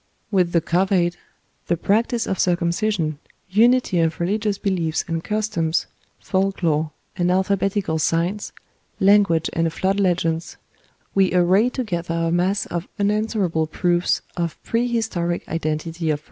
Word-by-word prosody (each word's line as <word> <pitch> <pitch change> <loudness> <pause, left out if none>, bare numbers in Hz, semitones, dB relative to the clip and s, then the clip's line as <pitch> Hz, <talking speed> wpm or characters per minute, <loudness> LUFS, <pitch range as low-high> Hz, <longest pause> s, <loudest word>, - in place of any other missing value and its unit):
With 180 -4 +2
the 170 - +3
couvade, 175 +1 +1 0.5
the 175 - +1
practice 225 +6 +1
of 190 - -2
circumcision, 170 -2 0 0.3
unity 230 -2 +4
of 165 -1 +1
religious 205 +3 0
beliefs 175 -6 -1
and 165 -1 -2
customs, 205 -7 0 0.3
folk 190 0 -1
lore, 155 -1 +1 0.3
and 175 -1 +1
alphabetical 190 -2 0
signs, 170 +6 0 0.5
language 195 -5 +4
and 165 0 +1
flood 190 +4 0
legends, 170 -3 0 0.6
we 190 -2 +3
array 185 +6 +4
together 175 -10 -3
a 165 0 0
mass 185 +4 +1
of 170 0 -4
unanswerable 200 -6 0
proofs 175 +2 +1
of 170 -2 -2
prehistoric 225 -8 -1
identity 165 +1 -2
of 150 - +1
race. - - -21
180 Hz, 130 wpm, -22 LUFS, 165-200 Hz, 0.6 s, unity